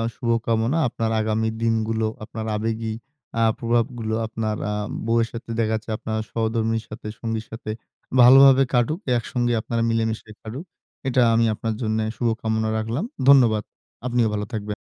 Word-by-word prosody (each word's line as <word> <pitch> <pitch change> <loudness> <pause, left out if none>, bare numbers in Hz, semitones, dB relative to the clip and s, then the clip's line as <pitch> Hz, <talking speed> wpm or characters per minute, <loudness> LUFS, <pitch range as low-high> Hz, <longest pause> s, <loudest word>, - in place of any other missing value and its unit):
শুভকামনা। 115 +3 0
আপনার 115 -1 -2
আগামী 110 +1 0
দিনগুলো 110 -1 +1 0.2
আপনার 110 +1 -6
আবেগী 110 +1 -2 0.5
আ - - +1 0.2
প্রভাবগুলো 115 -1 -1
আপনার 110 -1 -2
আ - - -1 0.3
বউয়ের 115 0 +2
সাথে 115 0 -8
দেখা 110 -1 +1
যাচ্ছে 110 +1 -6
আপনার 110 -1 -3
সহধর্মিণীর 115 0 -1
সাথে, 110 0 -8
সঙ্গীর 115 -1 -3
সাথে 115 -1 -7 0.5
ভালোভাবে 135 +2 +8
কাটুক, 125 +8 +2 0.2
একসঙ্গে 120 +1 -1
আপনারা 115 +1 -2
মিলেমিশে 110 -1 -1
কাটুক। 125 +10 -7 0.4
এটা 130 -1 +3
আমি 115 0 +3
আপনার 110 +1 -3
জন্য 110 -1 0 0.2
শুভ 120 -2 +1
কামনা 110 0 0
রাখলাম। 115 - -2 0.2
ধন্যবাদ। 120 -6 +6 0.4
আপনিও 120 -2 +2
ভালো 105 0 -2
থাকবেন। 105 -1 -3
115 Hz, 145 wpm, -23 LUFS, 110-120 Hz, 0.5 s, ভালোভাবে